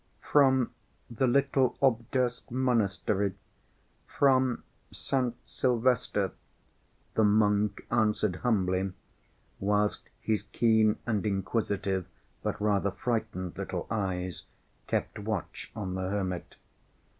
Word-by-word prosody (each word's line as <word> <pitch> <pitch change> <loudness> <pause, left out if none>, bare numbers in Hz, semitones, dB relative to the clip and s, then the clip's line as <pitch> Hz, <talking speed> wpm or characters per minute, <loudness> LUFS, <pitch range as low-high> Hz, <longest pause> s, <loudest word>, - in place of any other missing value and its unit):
"From 130 -4 +5 0.4
the 125 +3 +1
little 135 0 +2
Obdorsk 125 0 +1
monastery, 105 -6 +1 0.7
from 130 -3 +3 0.3
St. 125 -3 -1
Sylvester," 125 -1 +1 0.8
the 110 - +3
monk 105 -1 +3
answered 105 -4 +2
humbly, 95 -5 +1 0.7
whilst 105 +1 0
his 110 -2 0
keen 110 -2 +3
and 110 -4 0
inquisitive, 100 -2 -1 0.3
but - - -2
rather 100 -1 +2
frightened 95 -4 -2
little - - -3
eyes 95 -4 -2 0.4
kept - - -1
watch 105 -3 -4
on 95 -3 -3
the 95 0 -2
hermit. 95 -3 -3
105 Hz, 95 wpm, -29 LUFS, 100-120 Hz, 0.8 s, From